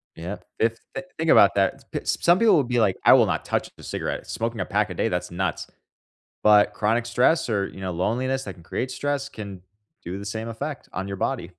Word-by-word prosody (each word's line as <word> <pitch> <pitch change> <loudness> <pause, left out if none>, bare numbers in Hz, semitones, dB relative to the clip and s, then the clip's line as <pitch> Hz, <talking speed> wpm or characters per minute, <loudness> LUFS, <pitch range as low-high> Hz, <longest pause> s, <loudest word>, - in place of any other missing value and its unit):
Yeah, 90 +5 -6 0.2
fif 115 0 +1 0.4
think 160 0 -1
about 100 - +6
that, 100 -1 +1
t - - -2
p - - -17
Some 175 +1 +3
people 230 -5 +5
will 145 - +4
be 120 0 0
like, 100 -4 +2
I - - +8
will - - +6
not - - -2
touch - - -1
the - - -14
cigarette, - - -4
smoking 115 0 -3
a - - -1
pack 105 0 0
a - - -3
day, - - 0
that's 90 0 -3
nuts, 90 -2 -2 0.8
but 105 -1 +5
chronic 115 +3 +1
stress 125 +5 +2
or, 100 -2 +1
you 95 - -12
know, 95 -1 -3
loneliness 125 +9 -1
that 95 - -7
can 85 - -17
create 125 +8 -3
stress 145 0 -2
can 100 -4 -8 0.4
do 90 +3 -5
the 100 - -7
same 110 +3 -4
effect 140 +6 -6
on 95 +1 -4
your 100 - -4
body. 125 -2 -1
105 Hz, 230 wpm, -24 LUFS, 95-130 Hz, 0.8 s, I